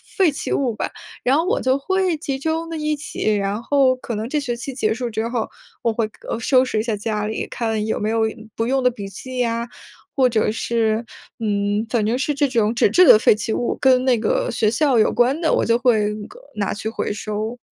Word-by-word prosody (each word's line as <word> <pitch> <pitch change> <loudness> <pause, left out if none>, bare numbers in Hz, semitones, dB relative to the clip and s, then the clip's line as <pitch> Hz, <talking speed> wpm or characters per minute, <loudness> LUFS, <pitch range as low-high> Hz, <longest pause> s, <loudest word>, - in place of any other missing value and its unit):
废 375 -6 +4
弃 280 - -4
物 265 -4 +1
吧。 - - -2 0.4
然 255 +3 +3
后 325 +3 +1
我 480 +6 +1
就 260 0 +2
会 375 +3 0
集 280 -3 -3
中 320 +3 -2
的 330 - -4
一 305 0 -1
起， 290 -8 -2
然 200 +2 -2
后 270 0 +3
可 255 -2 -6
能 220 +2 -3
这 300 - 0
学 250 -4 -3
期 250 +2 -7
结 220 -4 +1
束 245 +1 -3
之 220 0 -2
后， 235 -2 -2 0.3
我 230 - +1
会， 220 0 -1 0.2
呃， - - -1
收 255 +2 +4
拾 255 -4 -1
一 - - 0
下 225 -2 -1
家 210 0 -2
里， 215 +1 -3
看 225 -2 -2
有 220 - -1
没 215 +1 -1
有 225 0 +1 0.3
不 225 - -1
用 265 +1 +1
的 250 - +4
笔 205 -4 -7
记 255 +6 -7
呀， 235 -1 0 0.5
或 265 -2 +4
者 220 -2 +1
是， 225 0 0 0.4
嗯， 205 -1 0
反 220 -2 +1
正 235 +4 0
是 295 +3 0
这 285 +1 +2
种 230 -3 +1
纸 - - +4
质 365 - +5
的 - - +9
废 215 - +5
弃 210 +1 -4
物， 240 - -1
跟 255 -1 +4
那 250 -3 +3
个 - - 0
学 215 - +1
校 260 +1 +2
有 215 - +4
关 245 +6 +2
的， 320 - +2
我 - - +2
就 230 0 +3
会 220 -4 +3
那 210 -1 -7
个 - - -15 0.2
拿 200 -2 -1
去 215 +2 -4
回 225 - -3
收。 215 +3 -4
235 Hz, 255 characters per minute, -21 LUFS, 220-270 Hz, 0.5 s, 的